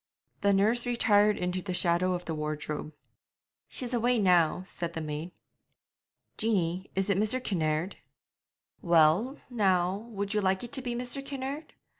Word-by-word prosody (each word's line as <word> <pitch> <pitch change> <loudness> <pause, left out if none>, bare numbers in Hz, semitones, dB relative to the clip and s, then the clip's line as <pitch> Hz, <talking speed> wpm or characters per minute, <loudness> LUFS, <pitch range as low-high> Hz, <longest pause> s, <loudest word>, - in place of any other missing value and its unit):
The 200 - +3
nurse 220 +5 +2
retired 210 -3 +3
into 180 +1 -2
the 185 -1 -4
shadow 180 +1 +2
of 180 0 -4
the 165 - -3
wardrobe. 150 0 -4 0.8
'She's 250 -1 -4
away 245 +1 +2
now,' 180 -4 +3
said 170 -2 -5
the 165 - -3
maid. 155 +2 -4 1.1
'Jeanie, 190 -4 0
is 195 +1 +1
it 195 - +1
Mr. 215 +5 +1
Kinnaird?' 165 -5 -1 0.8
'Well, 175 - +3
now, 190 -6 +1
would 200 -2 -3
you 210 - +1
like 190 +1 +1
it 240 - -7
to 270 - -2
be 245 -1 -3
Mr. 250 +3 -1
Kinnaird?' 275 +2 -5
195 Hz, 150 wpm, -29 LUFS, 175-235 Hz, 1.1 s, The